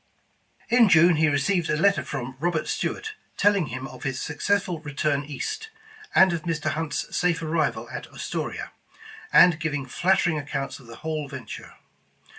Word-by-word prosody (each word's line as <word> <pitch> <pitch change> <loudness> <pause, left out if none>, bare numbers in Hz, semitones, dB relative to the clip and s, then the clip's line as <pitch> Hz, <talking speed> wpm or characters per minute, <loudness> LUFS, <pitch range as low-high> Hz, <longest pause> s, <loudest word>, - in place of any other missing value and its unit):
In 235 -2 +6
June, 165 0 +6
he 160 +1 +4
received 165 +5 +1
a 150 - +1
letter 200 +5 +3
from 130 -2 -5
Robert 170 0 0
Stuart 435 +1 -2 0.2
telling 200 -5 +3
him 130 +2 -5
of 130 -2 -12
his 135 -1 -2
successful 180 +3 -1
return 145 -1 -1
east, 430 - -5 0.5
and 190 -2 +6
of 170 - -2
Mr. 165 -3 -1
Hunt's 160 0 -3
safe 175 -2 +1
arrival 160 0 0
at - - -6
Astoria, - - -4 0.6
and 175 -3 +7
giving 145 -4 -2
flattering 175 +2 +2
accounts 140 -1 -4
of 125 - -16
the 115 - -10
whole 155 -2 -2
venture. 130 -6 -9
160 Hz, 155 wpm, -25 LUFS, 145-180 Hz, 0.6 s, and